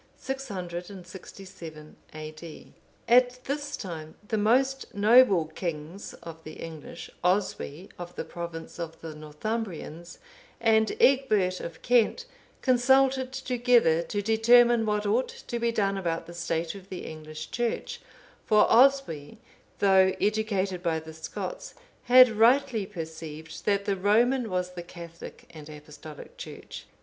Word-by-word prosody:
[667 180 - -8 0.2
A.D.] 155 +1 -9 0.3
At 250 +1 +4
this 285 +1 -3
time 160 -5 -7
the 220 - -1
most 260 +5 +1
noble 205 -4 +5
kings 165 +3 -6
of 160 -1 -10
the 155 - -9
English, 160 0 -9
Oswy, 180 -2 -1
of 175 0 -8
the - - -4
province 170 -1 -7
of 165 -1 -6
the 160 -1 -7
Northumbrians, 170 +1 -5 0.4
and 220 - +3
Egbert 215 - +3
of 170 -1 -8
Kent, 245 - +2 0.4
consulted 260 +1 +3
together 245 -9 +2
to 205 +4 -3
determine 230 +1 +5
what 210 0 0
ought 225 +5 +1 0.2
to 240 - -3
be 235 0 +1
done 195 -3 0
about 165 -3 -2
the 170 - -10
state 170 -1 -2
of 195 -1 -12
the 185 - -6
English 155 0 -8
Church, 240 - -3 0.5
for 215 -1 +5
Oswy, 230 - +3 0.4
though 190 -1 +4
educated 200 -3 0
by 165 -2 0
the 160 0 -11
Scots, 160 - -6 0.3
had 255 +1 +9
rightly 225 -1 +3
perceived 160 -3 -8
that 200 -1 +1
the 200 -1 +1
Roman 225 +5 +2
was 180 -1 -2
the 180 -1 -7
Catholic 170 -1 -11
and 155 -2 -11
Apostolic 150 0 -11
Church. - - -9
195 Hz, 130 wpm, -27 LUFS, 165-235 Hz, 0.5 s, had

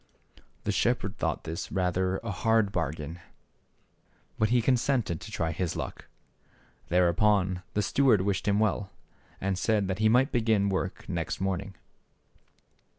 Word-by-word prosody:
The - - 0
shepherd 110 -4 0
thought - - -1
this 80 +1 -5
rather 95 0 0
a 115 - -3
hard 110 0 +2
bar 80 -8 0
gain, 80 +2 -7 1.2
but 110 - +3
he 125 +1 +4
consented 120 - +1
to - - -8
try 80 -1 -1
his 85 +1 -2
luck. - - -6 0.8
There 90 +1 +3
upon 95 0 +2
the 105 - +2
steward 130 -7 +3
wished 100 +1 -1
him 100 0 +3
well, 105 -2 +1
j^r.. - - -30
and 95 -1 -1
said 105 -3 +1
that 95 +1 -2
he 110 0 +4
might 125 +5 +4
begin 110 -4 +2
^ - - -1
wor 95 0 0
k - - -19
^0 - - -17
nex 85 -4 -2
t - - -4
morning. 95 0 -2
100 Hz, 170 wpm, -28 LUFS, 90-110 Hz, 1.2 s, he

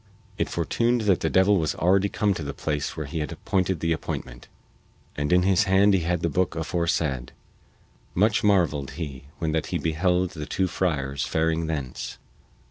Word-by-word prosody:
It - - 0
fortuned 115 +8 +1
that 100 -4 +3
the 80 - 0
devil 95 +3 +4
was 80 -3 0
already 95 +3 +3
come 105 0 +1
to 85 - -6
the 70 -1 -5
place 75 -2 -3
where 80 - -3
he 80 +4 -4
had 75 - -3
appointed 95 0 -1
the 85 - 0
appointment, 65 -6 -6 0.7
and 75 +1 -1
in 90 0 +5
his 95 -1 +3
hand 95 +2 +4
he 95 - +4
had 85 0 -1
the 85 - +1
booke 90 0 0
aforesaid. 80 -6 -1 0.8
Much 105 +4 +3
marveled 85 -9 +2
he 70 -5 -6
when 80 -2 -1
that 80 0 -1
he - - -1
beheld 90 +3 +1
the 75 -2 -7
two 95 - 0
friars 70 -7 -1
faring 80 0 0
thence. 70 -6 -4
85 Hz, 180 wpm, -25 LUFS, 75-95 Hz, 0.8 s, in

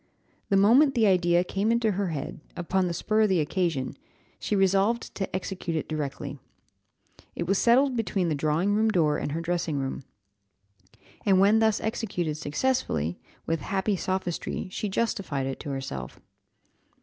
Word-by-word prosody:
The 195 - +4
moment 260 +8 +5
the 230 -2 +4
idea 175 -3 +3
came 200 +4 0
into 235 -2 +2
her 200 0 -1
head, 155 -4 -5 0.2
upon 185 +2 0
the 170 - -2
spur 215 +4 +1
of 215 - +4
the 185 -3 +3
occasion, 155 -4 -1 0.4
she 210 - -1
resolved 195 +4 +2
to 195 - -3
execute 185 -3 -3
it - - -3
directly. 150 -3 -4 1.0
It - - -2
was 195 +3 +1
settled 255 +3 +4
between 200 -5 0
the 160 - +1
drawing 155 +7 +1
room 220 +1 +3
door 155 -7 +2
and 145 - -3
her 165 - -2
dressing 165 -3 -1
room. 135 0 -3 1.2
And 190 -2 +4
when 205 +3 +5
thus 220 -2 +3
executed 195 -8 -2
successfully, 145 - -1 0.3
with 165 0 0
happy 195 +5 0
sophistry 185 -1 -3
she 210 - -3
justified 190 -10 -1
it 135 0 -4
to - - -6
herself. 130 - -5
185 Hz, 160 wpm, -27 LUFS, 155-210 Hz, 1.2 s, moment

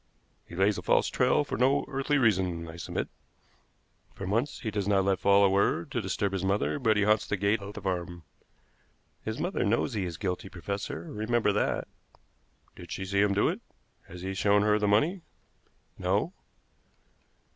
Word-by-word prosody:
He - - -10
lays 95 +2 +2
a - - -6
false - - +2
trail 130 +4 +2
for - - -4
no 135 +3 +3
earthly 135 +2 0
reason, 90 -9 +1
I 80 - -9
submit. - - -3 1.1
For 95 - -6
months 115 +9 -1
he 110 - -3
does 100 -2 -2
not 100 -2 +3
let 95 -2 +1
fall 100 0 +5
a - - +6
word 95 -3 +1
to - - -1
disturb 100 -1 -1
his 95 -1 -2
mother, 100 +8 0
but 110 -5 +2
he 105 - +3
haunts 105 +1 +2
the 100 - -1
gate 100 +2 +1
of 100 +1 -8
the 105 - -8
farm." 90 -2 -3 1.0
"His 110 +1 -4
mother 180 +3 -1
knows 115 +5 +1
he 100 -4 -1
is 85 -2 -5
guilty, 95 -1 -3
professor; 100 -2 -5
remember 110 +3 0
that." 105 - 0 0.9
"Did - - -11
she 95 - -4
see 100 +1 +1
him 100 -1 +2
do 105 - +3
it? - - -2 0.5
Has 90 +1 -10
he 95 0 -3
shown 100 +2 +3
her 105 0 +3
the 105 - +1
money?" 150 - +2 0.8
"No." 100 - 0
100 Hz, 185 wpm, -29 LUFS, 95-110 Hz, 1.1 s, a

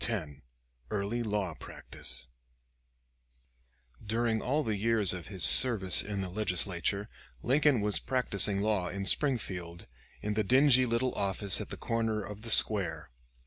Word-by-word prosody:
CHAPTER 100 -10 -3
X 70 0 -19 0.5
EARLY 105 +4 -3
LAW 105 -6 -2
PRACTICE - - -7 1.8
During 110 +1 -1
all 145 +4 -1
the 110 -5 -2
years 105 -2 +1
of 90 -3 -7
his 95 -4 -6
service 95 - +6
in 100 -1 -5
the 95 - -4
Legislature, 100 0 -1 0.4
Lincoln 140 -2 +2
was 105 0 0
practicing 100 -6 +1
law 105 -4 -1
in 100 +1 -5
Springfield 90 - -2 0.4
in 105 0 -2
the 110 0 0
dingy 130 +3 +4
little 120 +2 -1
office 100 0 -1
at - - -8
the - - -8
corner 115 -2 -2
of 105 +1 -9
the 115 - -9
square. 105 - +3
105 Hz, 145 wpm, -30 LUFS, 95-115 Hz, 1.8 s, service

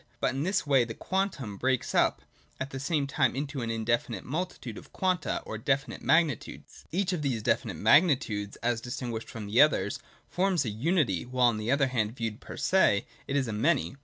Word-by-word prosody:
But - - +1
in 135 - -2
this 185 +3 0
way 135 -4 +4
the 115 -1 -6
quantum 165 - -2
breaks 130 +2 0
up - - +2 0.4
at 130 +1 -4
the 135 - -5
same 145 +1 0
time 140 -2 +1
into 140 0 -3
an 115 - -3
indefinite 115 -1 -1
multitude 150 - -4
of - - -12
Quanta 185 -2 -1
or 110 - -5
definite 135 +4 -1
magnitudes. 150 -1 0
Each 190 +2 0
of 170 - -2
these 125 -7 -1
definite - - 0
magnitudes, 130 - +3
as 120 -1 +1
distinguished 120 -2 -5
from 110 -2 -7
the 105 +4 +4
others, 100 -10 +3 0.3
forms 180 -5 +1
a - - -1
unity, 125 - +1
while 125 0 +3
on 110 - -2
the 110 +2 -3
other 140 +1 +3
hand, 115 -2 -1
viewed 115 -2 -4
per - - -9
se, 105 - +3 0.2
it 140 - -2
is 135 -3 +1
a 110 - -3
many. 135 +5 +1
130 Hz, 195 wpm, -29 LUFS, 115-150 Hz, 0.4 s, way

